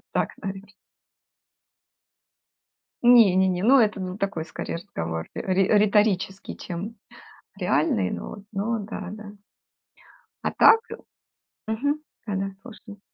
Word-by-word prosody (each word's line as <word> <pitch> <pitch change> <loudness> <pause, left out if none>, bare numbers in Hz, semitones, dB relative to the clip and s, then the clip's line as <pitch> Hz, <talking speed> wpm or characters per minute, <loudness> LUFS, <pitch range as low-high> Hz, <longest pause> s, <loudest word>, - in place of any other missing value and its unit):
Вот - - -35
так, - - 0
наверно. 195 +1 -6 2.3
Не-не-не, 190 -7 +5
ну, 265 +5 +6
это, 215 -4 +2
ну, 185 +1 -5
такой 195 -6 -2
скорее 160 - -6
разговор 80 - -5
ри 190 0 +1
риторический, 205 -2 +2
чем 195 +6 -6 0.6
реальный, 150 - +1
но - - -5
вот 205 - -10
но 220 +3 -1
да 205 -2 -6
да. 210 -1 -9 1.1
А - - 0
так 450 0 +6 0.9
мгм. 285 +7 -1 0.3
Да-да, 195 -1 -3
слушаю. 215 -4 -12
200 Hz, 110 wpm, -25 LUFS, 185-215 Hz, 2.3 s, ну